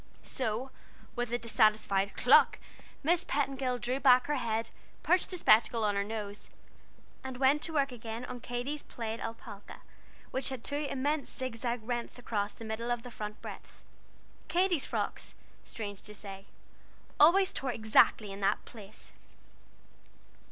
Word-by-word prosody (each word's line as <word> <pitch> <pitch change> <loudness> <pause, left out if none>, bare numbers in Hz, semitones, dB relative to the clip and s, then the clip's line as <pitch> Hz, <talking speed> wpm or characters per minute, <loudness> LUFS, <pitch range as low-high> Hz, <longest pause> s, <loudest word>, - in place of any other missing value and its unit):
So, 255 +1 -2 0.4
with 245 -1 -2
a 240 - +1
dissatisfied 215 -4 +2
cluck, - - +6 0.5
Miss 335 +4 +3
Petingill 270 -3 -1
drew 250 +2 -1
back 255 -2 +6
her 295 - 0
head, 225 -2 -1 0.3
perched 360 0 +3
the 365 - -5
spectacles 220 -4 +4
on 210 -1 +2
her 200 - +1
nose, 210 -1 -5 0.7
and 260 -1 -6
went 270 +3 +4
to 325 - -3
work 275 -3 +2
again 230 0 -6
on 250 -1 -7
Katy's 245 +5 -3
plaid 225 -1 -5
alpaca, 225 -3 -8 0.5
which 260 +1 -1
had 260 -3 -6
two 290 +1 -1
immense 285 +2 -1
zigzag 240 -1 -2
rents 240 +1 -3
across 210 -4 -2
the 225 - -9
middle 220 +2 -3
of 240 -1 -1
the 245 - -9
front 210 -1 -7
breadth. - - -10 0.6
Katy's 350 -2 +1
frocks, - - -3 0.3
strange 205 -3 -6
to 210 0 -8
say, 195 -1 -9 0.7
always 370 +5 +6
tore 265 -1 -1
exactly 220 -2 +3
in 195 - -7
that 195 - +1
place! 215 -2 -12
240 Hz, 145 wpm, -31 LUFS, 220-270 Hz, 0.7 s, cluck